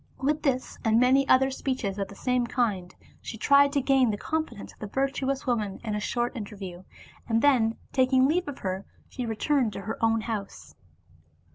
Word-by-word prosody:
With 295 +3 0
this 255 -3 -1
and 225 0 +3
many 265 +2 +4
other 265 +1 +4
speeches 255 -7 -3
of 195 - -1
the 200 - -12
same 250 +2 0
kind 205 -8 -1 0.3
she 220 - -7
tried 280 +4 +5
to 285 - +2
gain 265 -2 +3
the 205 - -1
confidence 310 -6 -4
of - - -26
the 210 - -5
virtuous 270 +3 -1
woman 215 -6 -1
in 215 -2 -3
a 210 - -1
short 240 +4 -2
interview, 195 -5 -7 0.5
and 225 0 +2
then 235 -6 +3 0.2
taking 260 0 +4
leave 345 +4 0
of 285 - -5
her 190 0 -3 0.3
she 250 -2 -5
returned 230 +1 0
to - - -6
her 220 +4 -5
own 225 0 +3
house. 215 -3 -6
240 Hz, 185 wpm, -27 LUFS, 210-270 Hz, 0.5 s, tried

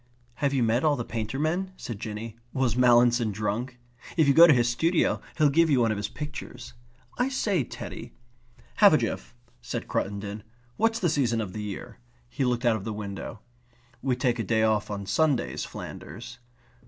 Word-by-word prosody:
"Have 140 -1 +2
you 135 -3 +1
met 115 +3 +2
all 150 -2 +3
the 120 -4 -4
painter 115 +2 -4
men?" 175 +6 -1
said 115 -4 -6
Jinny. 110 0 -6 0.2
"Was 130 -4 +1
Mallinson 120 -2 +4
drunk? 110 +5 -3 0.4
If 160 -3 +4
you 140 - +5
go 170 +4 +9
to 155 - +7
his 120 -2 +3
studio 165 +8 +1 0.2
he'll 150 -3 +4
give 165 +3 +4
you 135 -4 +4
one 115 -2 +3
of 110 - -1
his 105 0 -2
pictures. 145 -4 -8 0.5
I 250 +2 +2
say, 205 - 0
Teddy...." - - -8 0.7
"Half - - +7
a - - +6
jiff," - - -4 0.3
said - - -5
Cruttendon. 100 +1 -3 0.3
"What's 225 +1 +1
the 180 - +1
season 130 -7 +1
of 100 -5 -4
the 110 - -5
year?" 100 -10 -7 0.3
He 95 - -3
looked 125 -1 0
out 115 -2 +4
of 95 - -8
the 110 - -4
window. 105 +1 -6 0.6
"We 130 -2 +1
take 125 -1 0
a - - 0
day 110 +2 +1
off 110 -2 +1
on 100 -1 -4
Sundays, 140 +6 0
Flanders." - - -9
120 Hz, 190 wpm, -27 LUFS, 110-145 Hz, 0.7 s, go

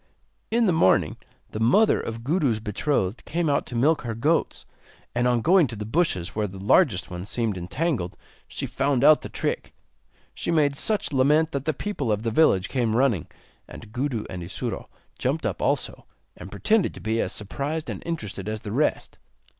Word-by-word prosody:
In 235 +1 +2
the 190 - +3
morning 160 -12 +3 0.4
the 110 - -5
mother 130 - +4
of 115 0 -6
Gudu's 140 -6 +1
betrothed 105 -1 -1
came 165 -1 -1
out - - 0
to 125 - -7
milk 150 +6 +3
her 115 -2 -4
goats, 150 +9 0 0.5
and 120 +1 +1
on 120 -1 +2
going 175 - +5
to 115 - -6
the 105 0 -5
bushes 105 - 0
where 105 -1 0
the 95 0 -10
largest 100 - +2
one 90 0 -5
seemed 110 0 -1
entangled, 90 - -2 0.3
she - - -4
found 135 -1 0
out 150 +1 +7
the - - -7
trick. - - -3 0.6
She - - -5
made 150 -4 +3
such 210 +1 0
lament 150 +4 +3
that 140 -1 -3
the 155 - +1
people 145 - -2
of 105 +1 -1
the 115 - -1
village 110 -9 +3
came 120 -4 0
running, 120 - +2 0.4
and 110 - -11
Gudu 125 -2 -2
and 90 - -6
Isuro 85 +2 -5 0.3
jumped - - -1
up - - -2
also, - - -1 0.3
and 90 - -10
pretended 205 - +1
to - - -9
be 110 +1 -1
as - - -2
surprised 145 +9 -4
and - - -5
interested 105 - -4
as 110 0 -4
the 105 - -6
rest. 145 +7 -1
125 Hz, 185 wpm, -25 LUFS, 105-155 Hz, 0.6 s, out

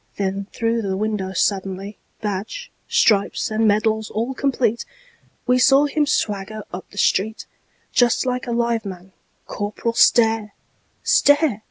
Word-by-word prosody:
Then 195 0 -2
through 230 0 -1
the 190 -2 -2
window 210 -2 -2
suddenly, 195 +1 -2 0.2
Badge, 215 - -4 0.2
stripes 200 0 +2
and 220 +1 +2
medals 215 +1 +1
all 230 +5 -2
complete, 255 -4 0 0.6
We 250 0 +3
saw 275 +3 +5
him 295 0 0
swagger 210 -5 -2
up 180 - -7
the 205 - -16
street, 215 +2 0 0.5
Just 245 0 +3
like 250 0 -2
a - - -2
live 235 -1 0
man—Corporal 200 +3 -6
Stare! 225 -3 +3 0.5
Stare! 290 -6 +3
220 Hz, 130 wpm, -21 LUFS, 200-240 Hz, 0.6 s, saw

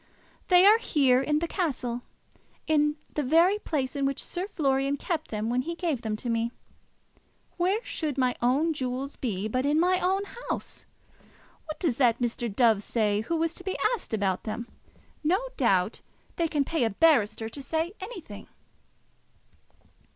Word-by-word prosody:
"They 360 0 +6
are 430 +3 +7
here, 270 - +3
in 300 +2 +1
the 335 +2 -1
castle; 255 - -2 0.6
in 300 -1 +2 0.2
the 300 - 0
very 335 +9 +4
place 280 -8 -2
in 280 - -1
which 275 -1 -1
Sir 365 +2 -4
Florian 275 -6 0
kept 320 0 -3
them 215 0 -2
when 245 +2 +1
he 335 +6 -4
gave 325 -8 -1
them 220 -2 -2
to 230 - -6
me. 230 0 0 1.1
Where 380 +6 +1
should 300 -4 -2
my 255 -2 +2
own 280 +7 +2
jewels 265 0 -3
be 210 -5 -2
but 255 +4 -1
in 295 +2 +2
my 365 +2 +3
own 385 +2 +1 0.3
house? - - -5 0.8
What 310 -1 -7
does 300 -10 0
that 240 -4 +4
Mr. 240 -1 -2
Dove 220 -1 +3
say, 210 -1 0
who 330 +9 -2
was 330 0 0
to 365 - -11
be 380 0 -3 0.2
asked 470 - -5
about 200 -4 0
them? 235 +2 -5 0.6
No 350 +6 +3 0.2
doubt - - +1 0.3
they 335 - +1
can 295 -3 +1
pay 325 -3 0
a 225 - +2
barrister 220 -4 +3
to 280 - -9
say 320 +6 -2
anything." 375 - -9
280 Hz, 165 wpm, -27 LUFS, 240-335 Hz, 1.1 s, are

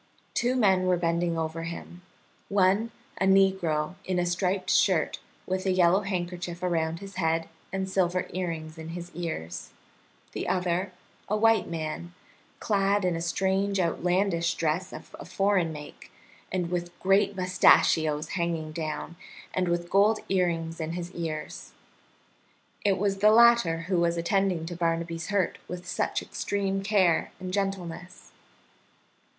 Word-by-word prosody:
Two 245 +1 +1
men 190 -6 +3
were 180 -1 +3
bending 170 0 0
over 160 0 -3
him 170 +1 -7 0.5
one, 200 +3 +3 0.3
a 190 - +2
negro 190 -5 +3
in 185 -1 -1
a 175 - +1
striped 180 +2 0
shirt, - - +2 0.3
with 185 +1 -2
a - - +3
yellow 185 0 +4
handkerchief 180 -3 -4
around 165 -1 0
his 195 -1 -9
head 165 -1 +1 0.2
and 190 0 -2
silver 185 -1 +1
earrings 165 -3 -4
in 160 0 -7
his 175 0 -8
ears; 120 - -5 0.6
the - - -4
other, 180 +1 0 0.4
a 210 - +1
white 225 +1 +3
man, 165 +1 -5 0.4
clad 200 -1 +1
in 180 -2 +1
a 165 - -3
strange 190 +3 0
outlandish 175 0 +1
dress 170 +4 -1
of - - -10
a - - -7
foreign 195 -4 +1
make, 150 -1 -10 0.4
and 180 -2 -1
with 175 -1 -4
great 195 +1 +3
mustachios 160 -4 +3
hanging 170 -3 -2
down, 160 +1 -4 0.4
and 185 -1 0
with 175 0 -1
gold 210 +2 +4
earrings 170 -3 0
in 160 +1 -3
his 175 0 -5
ears. 160 -3 -5 1.1
It 195 -2 +3
was 195 0 0
the 210 +2 +6
latter 230 -7 +5
who 180 +1 0
was 170 0 +1
attending 180 -1 +1
to 175 +1 -5
Barnaby's 165 -1 -1
hurt 200 -4 0
with 180 0 -7
such - - -1
extreme 195 -1 -2
care 195 -5 +2
and 185 0 -6
gentleness. 185 -3 -4
180 Hz, 145 wpm, -27 LUFS, 165-195 Hz, 1.1 s, the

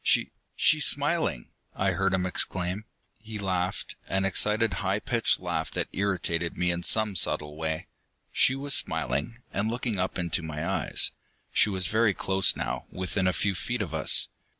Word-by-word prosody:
"She - - +2 0.2
she's 155 -1 +4
smiling!" 145 - 0 0.3
I 95 0 +1
heard 95 +1 +1
him 90 -1 -1
exclaim. 90 +2 -1 0.3
He 110 0 -7
laughed, 95 -1 -2
an 95 +1 0
excited, 105 +2 +2
high 95 +1 +1
pitched 120 -1 +1
laugh - - -2
that - - -2
irritated 85 -4 -1
me 90 0 +2
in 85 0 -3
some 105 +2 +3
subtle 75 -4 +2
way. 80 0 -3 0.5
She 130 - +3
was 140 +1 -2
smiling, 115 - 0
and 105 +2 0
looking 115 -3 -2
up 95 - -1
into 90 0 -1
my 75 -1 -4
eyes. - - +1 0.4
She - - +4
was 95 -2 +2
very 110 -1 +3
close 95 -1 +1
now, - - -3
within 95 +1 -2
a - - +4
few 100 +1 0
feet 115 +6 -2
of 80 -6 -7
us. 80 -2 +3
95 Hz, 170 wpm, -27 LUFS, 90-110 Hz, 0.5 s, she's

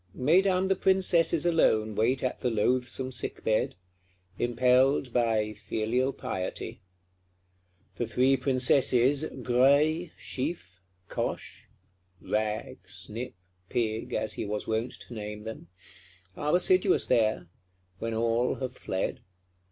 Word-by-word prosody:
Mesdames 185 +7 +3
the 190 - +2
Princesses 180 -4 +3
alone 110 -11 +2
wait 120 +6 +1
at 130 - -2
the 125 - 0
loathsome 125 +3 0
sick 125 - -4
bed; 110 -3 +1 0.6
impelled 125 +2 +2
by 110 -3 +1
filial 120 +6 -1
piety. 95 -7 -5 1.2
The 120 - -2
three 130 +4 +3
Princesses, 130 +1 +3 0.2
Graille, 145 +7 +3
Chiffe, 130 - -5 0.3
Coche - - -5 0.5
(Rag, 110 0 -2
Snip, 115 +4 -5 0.3
Pig, 110 -2 -2
as 110 0 -1
he - - -4
was 105 0 -3
wont 110 +2 -2
to - - -10
name 105 -1 -6
them), 110 -5 -8 0.7
are 150 +3 0
assiduous 185 +1 +3
there; 110 -6 +1 0.5
when 115 0 -3
all 115 +2 +1
have 130 -2 -5
fled. 95 - -3
125 Hz, 115 wpm, -28 LUFS, 110-140 Hz, 1.2 s, Mesdames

